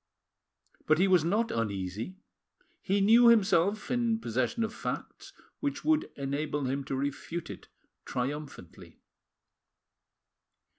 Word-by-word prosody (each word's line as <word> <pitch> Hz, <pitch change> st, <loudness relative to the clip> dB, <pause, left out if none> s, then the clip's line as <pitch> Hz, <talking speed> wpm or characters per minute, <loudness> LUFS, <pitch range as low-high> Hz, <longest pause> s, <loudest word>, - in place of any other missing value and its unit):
But 155 Hz, -, +4 dB
he 190 Hz, +3 st, +3 dB
was 180 Hz, -4 st, +4 dB
not 210 Hz, +7 st, +1 dB
uneasy; 105 Hz, -, -3 dB, 0.7 s
he 195 Hz, +1 st, +1 dB
knew 230 Hz, +4 st, +6 dB
himself 210 Hz, -1 st, +3 dB
in 235 Hz, -2 st, +1 dB
possession 130 Hz, -, -1 dB
of 220 Hz, 0 st, -3 dB
facts -, -, -6 dB, 0.3 s
which 285 Hz, -1 st, -3 dB
would 315 Hz, 0 st, +2 dB
enable 145 Hz, +1 st, -2 dB
him 135 Hz, +2 st, -2 dB
to 135 Hz, -, -3 dB
refute 145 Hz, +5 st, -4 dB
it -, -, -11 dB, 0.4 s
triumphantly. 135 Hz, -, -6 dB
165 Hz, 110 wpm, -29 LUFS, 135-225 Hz, 0.7 s, knew